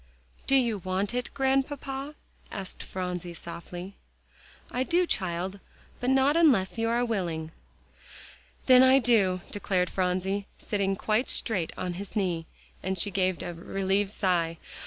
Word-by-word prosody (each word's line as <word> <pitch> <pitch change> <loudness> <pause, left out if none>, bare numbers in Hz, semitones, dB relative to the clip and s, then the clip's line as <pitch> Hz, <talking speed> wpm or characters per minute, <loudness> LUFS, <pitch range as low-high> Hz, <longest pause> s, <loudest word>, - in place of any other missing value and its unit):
"Do 275 - +4
you 235 -6 +3
want 190 +4 -1
it, 250 0 -2
Grandpapa?" 270 +1 -1 0.4
asked 195 -1 -6
Phronsie 180 -2 -4
softly. 175 +3 -8 0.7
"I 250 - -1
do, 345 +7 +3
child; 185 - -2 0.4
but 250 - 0
not 270 +3 +4
unless 245 - +4
you 225 0 +1
are 240 +1 +2
willing" 170 -8 -2 1.1
"Then 255 -1 +8
I 260 +1 +7
do," 210 -8 +3
declared 185 -3 0
Phronsie, 190 +2 0
sitting 195 -2 -1
quite 215 +5 0
straight 190 -8 0
on 180 -1 -2
his 200 +2 -9
knee. 175 -5 0 0.3
And 190 0 -2
she 200 +4 +1
gave 185 -1 0
a 175 - -4
relieved 195 +3 0
sigh. 175 -5 0
195 Hz, 135 wpm, -28 LUFS, 180-245 Hz, 1.1 s, Then